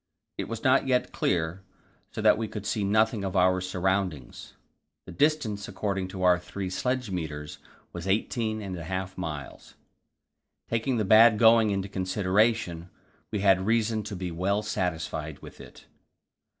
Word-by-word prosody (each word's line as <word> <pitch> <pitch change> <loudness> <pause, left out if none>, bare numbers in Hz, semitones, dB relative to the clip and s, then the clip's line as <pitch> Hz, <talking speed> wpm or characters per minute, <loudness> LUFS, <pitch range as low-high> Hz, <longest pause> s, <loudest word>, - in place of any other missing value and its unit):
It - - -2
was 115 -1 -6
not 130 +1 +3
yet 125 -1 +1
clear, 85 +1 -1 0.5
so - - -6
that - - +6
we 110 0 -3
could 105 -1 -7
see 105 -1 -1
nothing 110 +1 +2
of 95 -1 -3
our 95 0 +3
surroundings. 90 -6 -2 0.5
The - - -10
distance 115 - 0
according 95 -1 -3
to 95 0 -6
our 90 -1 +5
three 95 +1 -6
sledge 125 +2 -2
meters 75 -4 -5 0.3
was 85 +1 -6
eighteen 110 +2 -1
and 95 -2 -5
a - - -7
half 95 +1 -4
miles; 75 -6 -7 0.9
taking 115 +2 -1
the 110 - 0
bad 110 +2 +7
going 115 0 +6
into 100 -1 -1
consideration, 95 -1 0 0.4
we 105 - -2
had 95 -1 +3
reason 115 -1 +1
to 105 -1 -5
be 90 -1 -4
well 100 +5 0
satisfied 80 -7 -3
with - - -11
it. - - -14
95 Hz, 155 wpm, -27 LUFS, 90-110 Hz, 0.9 s, bad